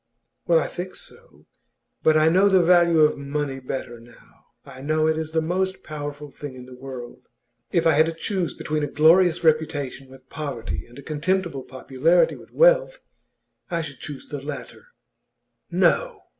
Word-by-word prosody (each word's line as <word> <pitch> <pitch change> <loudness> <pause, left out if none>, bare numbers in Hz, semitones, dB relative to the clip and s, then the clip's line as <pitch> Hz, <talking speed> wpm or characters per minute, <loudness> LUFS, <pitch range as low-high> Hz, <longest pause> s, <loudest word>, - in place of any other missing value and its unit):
'Well, 170 - +5
I 160 - +1
think 180 +1 -6
so. 485 +1 -14 0.6
But 155 0 +4
I 155 0 +4
know 190 +5 +5
the 190 -2 +5
value 170 -2 +5
of 150 -1 +3
money 140 -1 -3
better 125 -2 -6
now. 115 0 -20 0.2
I 130 - -11
know 155 +2 +1
it 160 0 +2
is 160 0 -4
the 160 0 0
most 190 +3 -2
powerful 145 -1 -7
thing 145 -2 -8
in 125 -1 -10
the 130 - -12
world. 125 -1 -9 0.4
If 170 -2 +1
I 165 - +5
had 155 +2 +4
to - - -1
choose 180 +1 -2
between 155 0 -2
a 145 - -1
glorious 165 +4 +4
reputation 145 -4 0
with 130 0 -16
poverty 115 - -5
and 120 +2 -16
a 140 - -10
contemptible 165 -1 -1
popularity 135 +6 +1
with - - -15
wealth, - - +3 0.7
I 170 -2 -1
should 145 -4 -9
choose 145 -2 -8
the 145 -2 -6
latter.' 150 - -8 0.8
'No! - - +1
155 Hz, 170 wpm, -23 LUFS, 135-175 Hz, 0.8 s, Well